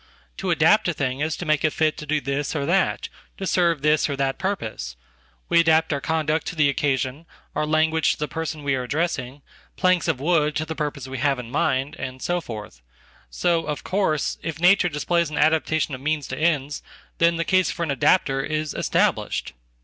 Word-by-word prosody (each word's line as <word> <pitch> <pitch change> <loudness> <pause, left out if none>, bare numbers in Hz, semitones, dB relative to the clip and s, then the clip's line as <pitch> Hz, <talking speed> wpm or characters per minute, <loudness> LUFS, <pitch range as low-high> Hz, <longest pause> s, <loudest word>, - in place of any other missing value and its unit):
To - - -3
adapt - - +4
a - - 0
thing 130 -1 -2
is 155 +1 -1
to 175 - -5
make 155 -1 +1
it 155 - +3
fit 155 -1 +1
to 150 - -8
do 155 +1 +1
this 140 +2 -2
orthat, 165 +6 +1 0.3
to 195 - -4
serve 170 -6 +2
this 150 0 +3
or 140 - -1
that 135 0 -1
purpose. 110 - -3 0.5
We - - +4
adapt 160 -1 +3
our 140 - -2
conduct 160 -1 0
to - - -4
theoccasion, 140 0 0 0.3
our 150 - 0
language 160 +1 +2
to - - -10
the 150 - -2
person 160 -1 -4
we 140 -1 +1
are 130 - 0
addressing, 140 -1 -2 0.3
planks 185 -2 +2
ofwood 150 0 +1
to 155 - -1
the 160 - -4
purpose 145 -4 -4
we 130 -1 -5
have 140 +1 +2
in 120 -1 -8
mind, 130 +2 0
and 130 -1 -5
so 175 +5 -1
forth. 105 - -8 0.5
So, 165 - 0
of 150 -1 -3
course, 185 -6 0
if 160 -1 -5
nature 180 +1 +5
displays 170 +2 0
an 155 - -5
adaptation 155 -1 +2
of 130 - -6
means 150 -1 -1
to 130 - -3
ends, 145 -2 0 0.4
then 170 0 +4
the 165 0 -1
casefor 185 -2 +1
an 160 - -1
adapter 135 0 +2
is 155 +1 -2
established. 65 +1 0
150 Hz, 195 wpm, -23 LUFS, 140-165 Hz, 0.5 s, nature